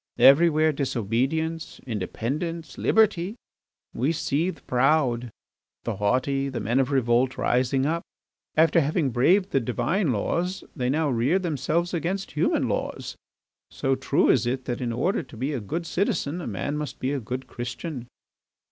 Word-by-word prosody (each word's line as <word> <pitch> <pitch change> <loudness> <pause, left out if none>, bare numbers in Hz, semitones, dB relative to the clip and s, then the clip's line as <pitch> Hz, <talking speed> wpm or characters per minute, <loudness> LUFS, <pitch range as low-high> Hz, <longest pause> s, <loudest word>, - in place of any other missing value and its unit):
Everywhere 155 +2 +6
disobedience, 140 +5 -1
independence, 135 - -3
liberty! 205 -3 +2 0.6
We 130 +7 +1
see 160 +1 0
the - - -8
proud, 125 -2 +2 0.5
the - - -3
haughty, 135 +6 +1
the 130 - -4
men 120 +5 +1
of 135 - +2
revolt 125 -1 +2
rising 130 +2 +1
up. 165 +3 0 0.6
After 165 +1 +5
having 145 -1 0
braved 185 - +3
the 135 - +3
Divine 145 - 0
laws 175 - -1
they 125 -4 -1
now 155 +2 +1
rear 125 +9 +2
themselves 170 0 -1
against 180 +4 -2
human 150 - +1
laws, - - -3 0.5
so 135 - 0
true 130 - +2
is 120 -2 +2
it 130 +1 -2
that 120 0 -3
in 120 -2 -1
order 135 - 0
to 125 - -13
be 135 +6 -2
a 135 - -1
good 165 - -4
citizen 175 -3 -1
a - - -5
man 120 +8 -3
must 150 -2 -5
be 130 - -1
a 145 - -1
good 125 +3 -5
Christian. 120 +2 -6
140 Hz, 155 wpm, -25 LUFS, 125-165 Hz, 0.6 s, Everywhere